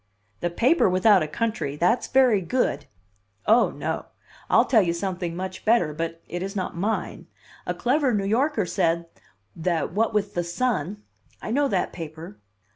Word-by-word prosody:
"The 175 - -1
paper 245 - +3
without 185 +1 +5
a 155 - -1
country! 215 -5 -2
That's 180 +10 +1
very 255 -6 +4
good!" 170 - -1 0.6
"Oh, 230 +3 +5
no! - - -4 0.4
I'll - - +5
tell 225 -4 +4
you 170 -3 0
something 175 -1 -3
much 185 +1 -6
better, 215 -9 +3
but 165 +1 -5
it 175 - -5
is 195 +2 -4
not 185 -3 -3
mine. 205 +6 -3 0.4
A - - -1
clever 265 +2 +1
New 205 -3 0
Yorker 235 +1 +1
said 170 -1 0 0.5
that 165 -1 -1
what 220 +3 +1
with 210 -2 -1
The 175 - -1
Sun 205 0 -2 0.2
" - - -35
"I - - -4
know 285 +4 +2
that 190 -8 -1
paper." 160 -8 -8
190 Hz, 170 wpm, -24 LUFS, 170-230 Hz, 0.6 s, without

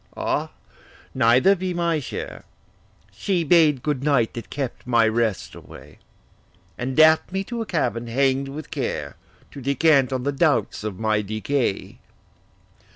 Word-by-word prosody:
Ah, - - -1 0.6
neither 125 +13 +4
be 185 -1 -4
my 170 -2 0
share: 140 - -7 0.7
She 175 - -1
bade 155 -5 +4
good 145 -3 -2
night 140 -6 +2
that 115 -2 -8
kept 135 -3 -5
my 115 -2 +3
rest 110 -3 -1
away; - - -14 0.8
And 130 +1 -4
daff'd 160 +2 +5
me 190 +1 -2
to 235 +3 -5
a 225 - -5
cabin 120 - -1
hang'd 135 +3 +1
with 150 +3 -8
care, 80 - -4 0.4
To 140 - -9
descant 140 0 +3
on 130 -1 -2
the 140 - 0
doubts 140 - 0
of 105 -4 -5
my 110 0 0
decay. 110 +2 -2
135 Hz, 145 wpm, -23 LUFS, 115-155 Hz, 0.8 s, daff'd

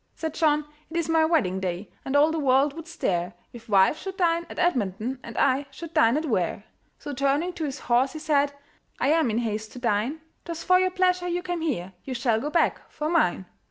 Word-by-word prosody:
Said 320 -2 -4
John, 300 -2 +2 0.2
"It 335 - -4
is 335 -2 0
my 320 -1 +4
wedding 195 - +1
day, 185 +1 -4
And 270 - -3
all 295 +2 +5
the 320 - -1
world 275 0 +3
would 330 +1 -9
stare 180 - -2 0.2
If 230 -2 -12
wife 195 +9 +4
should 385 -1 -6
dine 340 -2 +1
at - - -9
Edmonton, 245 - 0
And 230 - -9
I 275 +1 +2
should 330 +3 -9
dine 230 +4 +4
at 315 - -2
Ware." 200 - -1 0.3
So 290 - -7
turning 280 +6 +1
to 325 -3 -3
his 275 -3 -5
horse, 250 +2 +2
he - - -6
said 290 -2 +1 0.5
"I 265 - +2
am 315 -4 +3
in 220 - -1
haste 220 -2 -3
to 250 - -8
dine; 240 +6 0 0.2
'Twas 335 -1 -6
for 365 0 +5
your 370 0 +2
pleasure 365 -1 +1
you 350 0 -2
came 350 -2 -3
here, 190 - -2
You 260 - -5
shall 230 -2 +1
go 295 - -2
back 335 +2 0
for 305 +1 -3
mine." 250 - +2
285 Hz, 225 wpm, -26 LUFS, 230-330 Hz, 0.5 s, all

